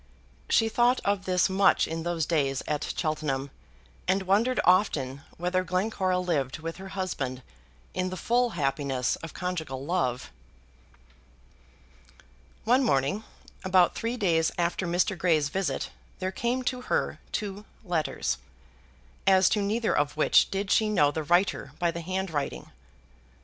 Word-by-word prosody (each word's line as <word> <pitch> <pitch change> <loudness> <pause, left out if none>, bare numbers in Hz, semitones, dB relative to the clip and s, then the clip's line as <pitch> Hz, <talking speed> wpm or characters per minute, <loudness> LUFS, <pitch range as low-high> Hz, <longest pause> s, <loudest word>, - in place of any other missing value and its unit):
She 225 - +4
thought 240 +3 +3
of 200 -1 0
this 180 -1 +3
much 195 +1 +3
in 165 0 -4
those 170 -2 -1
days 140 -5 0
at 150 -1 -1
Cheltenham, 150 -4 -2 0.6
and 190 +1 +2
wondered 215 +7 +2
often 145 -8 +2 0.2
whether 180 +2 0
Glencora 185 0 0
lived 155 -8 -1
with 165 +1 -6
her 190 0 -8
husband 135 -9 -3 0.5
in 185 0 -1
the 185 - -5
full 245 +4 +2
happiness 135 -3 0
of 165 - -9
conjugal 160 -7 -4
love. 130 -8 -1 2.3
One 250 +5 +4
morning, 145 - +1 0.4
about 185 -2 +4
three 235 +2 -3
days 165 -7 +2
after 175 +1 0
Mr. 180 +3 +1
Grey's 160 -5 +2
visit, 175 -6 -2 0.3
there 185 0 -2
came 240 +5 -1
to 250 0 -2
her - - -1
two 205 -1 -4 0.2
letters, 170 -4 -1 0.9
as 190 -1 +6
to 210 - +1
neither 220 +3 0
of 145 +1 0
which 155 - +4
did 195 0 -2
she 215 -1 +3
know 150 -9 +3
the 160 - -3
writer 175 +6 +1
by 175 -2 +1
the 170 +1 -5
handwriting. 165 - -3
180 Hz, 140 wpm, -27 LUFS, 150-195 Hz, 2.3 s, as